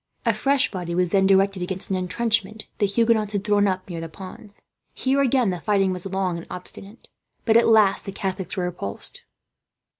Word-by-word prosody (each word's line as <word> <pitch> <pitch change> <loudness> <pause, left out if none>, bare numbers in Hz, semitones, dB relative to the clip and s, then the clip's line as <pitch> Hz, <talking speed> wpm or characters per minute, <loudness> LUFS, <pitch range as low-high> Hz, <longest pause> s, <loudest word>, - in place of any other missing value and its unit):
A 230 - +3
fresh 275 +5 +1
body 175 -3 -4
was 180 -1 +1
then 195 -1 +4
directed 195 -1 +3
against 185 +2 -1
an - - +2
intrenchment 215 +3 -1
the 205 - +3
Huguenots 220 0 +1
had 200 -1 -1
thrown 205 -1 +3
up, 185 -1 -2
near 170 -3 -5
the 165 - -6
ponds. 195 +4 -11 0.3
Here 270 +1 +1
again 255 -5 +2
the 180 - -4
fighting 195 0 +1
was 180 +1 -4
long 190 -2 -1
and 170 - -11
obstinate, 195 +4 -9 0.4
but 225 - +3
at 230 - +6
last 215 -3 +4
the 195 - -4
Catholics 190 -2 -4
were 180 - 0
repulsed. 175 - -4
195 Hz, 190 wpm, -23 LUFS, 185-220 Hz, 0.4 s, at